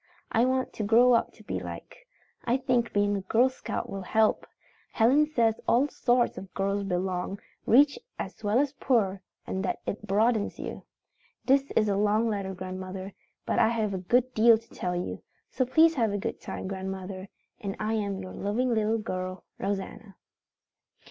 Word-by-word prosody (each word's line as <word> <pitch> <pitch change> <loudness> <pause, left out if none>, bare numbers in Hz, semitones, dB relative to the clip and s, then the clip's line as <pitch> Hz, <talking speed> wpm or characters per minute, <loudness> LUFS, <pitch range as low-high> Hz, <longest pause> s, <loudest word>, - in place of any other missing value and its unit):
I 230 +2 +3
want 260 0 0
to 215 - -4
grow 235 +4 +5
up 235 - +2
to - - -17
be - - -3
liked. - - -8 0.5
I 245 +2 +2
think 250 -3 0
being 205 0 +2
a 200 - -2
Girl 230 +7 +3
Scout 260 - -5
will 195 - -5
help. 220 +3 +1 0.5
Helen 270 +7 +4
says 230 -7 +1
all 265 +5 +3
sorts 245 -3 +1
of 190 -1 -11
girls 200 +1 0
belong, 185 +1 -2 0.3
rich 280 +4 +5 0.2
as 195 +3 -7
well 210 +2 +2
as 275 0 +1
poor, 200 -7 +1 0.2
and 190 - -3
that - - -2
it 210 +1 -5
broadens 215 +2 +1
you. - - -7 0.6
"This 275 +1 +3
is 215 - +3
a 200 -1 +1
long 210 +2 +2
letter, 195 -3 -2
grandmother, 185 +1 -6 0.3
but - - 0
I - - +5
had 220 -3 0
a 190 - -2
good 245 +7 +1
deal 225 +1 +6
to 230 +1 -18
tell 180 0 -3
you. 175 - -4 0.3
So 255 - 0
please 320 +5 +5
have 230 -8 +1
a 205 - -1
good 195 - -4
time, - - -6
grandmother, 190 0 -5 0.3
and 195 -2 -4
I 215 +1 -1
am 200 -3 -1
your 185 -1 -7
loving 235 +5 0
little 220 0 +1
girl 185 -4 -4 0.2
"ROSANNA." 195 +1 -4
215 Hz, 180 wpm, -28 LUFS, 195-240 Hz, 0.6 s, deal